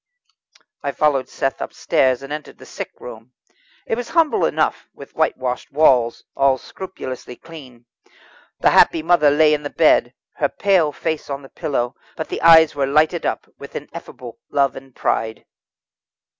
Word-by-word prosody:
I 140 - -3
followed 145 -4 +1
Seth 135 -1 -2
upstairs, 130 0 0
and 135 +2 -6
entered 150 0 -8
the - - -14
sick - - -7
room. - - -11 0.5
It 225 - -2
was 245 -1 -5
humble 325 -3 +2
enough, - - -1
with - - -13
whitewashed 125 - -1
walls, 130 -6 +3
all 135 -1 +3
scrupulously 130 -9 -8
clean. 130 -7 -14 0.8
The - - +4
happy 160 - +4
mother 165 -3 +4
lay 150 +1 +4
in 150 - 0
the 145 - -5
bed, 135 -7 +3 0.2
her 145 - +1
pale 185 -7 +2
face 160 +1 -4
on 140 0 -5
the 135 - -13
pillow, 135 -6 -2 0.2
but 160 - -5
the - - -4
eyes 160 -1 +7
were 140 -2 -1
lighted 155 +4 +2
up - - -3
with - - -11
ineffable 115 -2 -9
love 140 -2 +1
and 135 -1 -12
pride. 110 -1 -2
145 Hz, 155 wpm, -20 LUFS, 130-160 Hz, 0.8 s, eyes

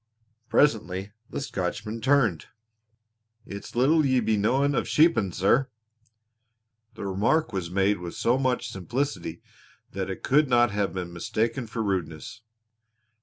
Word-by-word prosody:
Presently 100 -8 +1 0.2
the - - -4
Scotchman 105 -2 -4
turned. 125 - +2 1.0
"It's 100 +3 -9
little 150 +6 +4
you 130 -3 +2
be 110 0 +2
knowin' 130 +8 +2
of - - 0
sheepin', 155 - +3
sir." 110 +10 +2 1.3
The - - -6
remark 105 +10 +1
was 90 -3 -3
made 100 +2 +1
with 90 -1 -7
so 120 +3 +1
much 130 -2 -1
simplicity 95 - -3 0.5
that - - -4
it - - -6
could 145 +1 +3
not 120 -2 +4
have 100 -3 -1
been 90 -1 -5
mistaken 110 +6 -2
for 110 +1 -3
rudeness. 90 -2 -3
110 Hz, 130 wpm, -26 LUFS, 95-130 Hz, 1.3 s, little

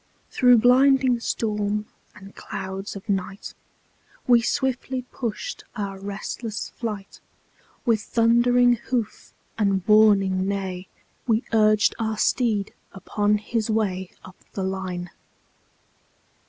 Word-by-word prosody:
Through 250 -1 +5
blinding 255 +1 +4
storm 210 -2 -2 0.3
and 195 -1 -13
clouds 195 +1 -6
of 200 +2 -10
night, 195 -1 -3 0.7
We 240 -2 +5
swiftly 260 0 -1
pushed 245 - -5
our 200 -3 -4
restless 205 +2 -5
flight; 210 -4 -6 0.7
With 225 -4 +2
thundering 240 +2 +3
hoof 235 -1 -4 0.2
and 195 -3 +1
warning 195 -3 +4
neigh, 190 -2 -3 0.4
We 225 +1 +2
urged 215 -1 +4
our 220 -1 -1
steed 215 -4 +1 0.2
upon 205 +2 0
his 220 +1 -3
way 190 -4 -1 0.2
Up 185 -1 -13 0.2
the 195 - -3
line. 185 -2 -4
210 Hz, 105 wpm, -24 LUFS, 195-235 Hz, 0.7 s, Through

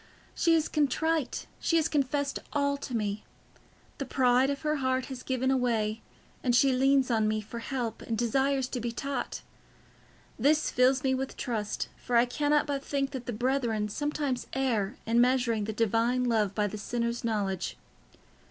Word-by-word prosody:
She 335 -1 +3
is 315 -1 +2
contrite, 305 0 0
she 335 - +1
has 320 -1 +3
confessed 285 0 0
all 280 -1 +1
to 265 -3 -4
me. 210 -1 -2 0.8
The 275 - -2
pride 255 0 +3
of 280 +2 -3
her 305 0 +1
heart 260 -1 0
has 250 - -8
given 260 +1 +1
way, 225 -3 0 0.4
and 245 -2 +2
she 270 +1 +5
leans 270 0 +3
on 220 -2 +2
me 215 0 +1
for 215 +2 -7
help 235 -2 -3
and 225 - -3
desires 265 +3 +1
to 250 - -3
be 235 +1 -2
taught. 270 +1 -4 1.0
This 300 +6 +3
fills 255 +1 +3
me 265 -1 +2
with 265 0 -3
trust, 220 -5 -2
for 245 - -3
I 235 +1 +6
cannot 290 +4 +1
but 280 -2 -3
think 275 -1 -1
that 260 -3 -6
the - - -1
brethren 235 -3 0
sometimes 290 0 -2
err 245 -4 0
in 230 +1 +3
measuring 240 -4 +2
the 220 - -2
Divine 230 +3 +1
love 220 -5 +1
by 210 - +1
the 205 +1 -4
sinner's 235 +2 -2
knowledge. 200 -5 -1
250 Hz, 170 wpm, -29 LUFS, 230-275 Hz, 1.0 s, I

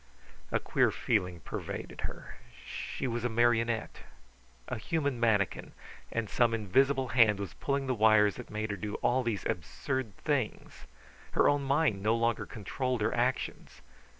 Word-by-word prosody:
A - - +2
queer - - +2
feeling 90 -2 -1
pervaded - - -6
her: - - -7 0.3
She - - -5
was 120 -2 -2
a 120 - +1
marionette, 115 0 +1 0.7
a - - -3
human 140 -1 -1
manikin, 105 -5 +1 0.4
and 115 -2 -1
some 115 +2 +2
invisible 130 +5 +2
hand 115 -4 +5
was 100 -2 -5
pulling 140 -1 -1
the 130 - 0
wires 110 -2 +4
that - - -8
made 110 0 -3
her 100 - -3
do 105 +2 -4
all 130 +2 +3
these 115 -6 -2
absurd 115 - -3
things. 135 -7 -3 0.5
Her - - +4
own 145 0 +3
mind 140 -6 +1
no 110 +3 +2
longer 115 0 0
controlled 125 +3 -3
her 105 - +1
actions. 125 - -2
115 Hz, 150 wpm, -31 LUFS, 105-130 Hz, 0.7 s, hand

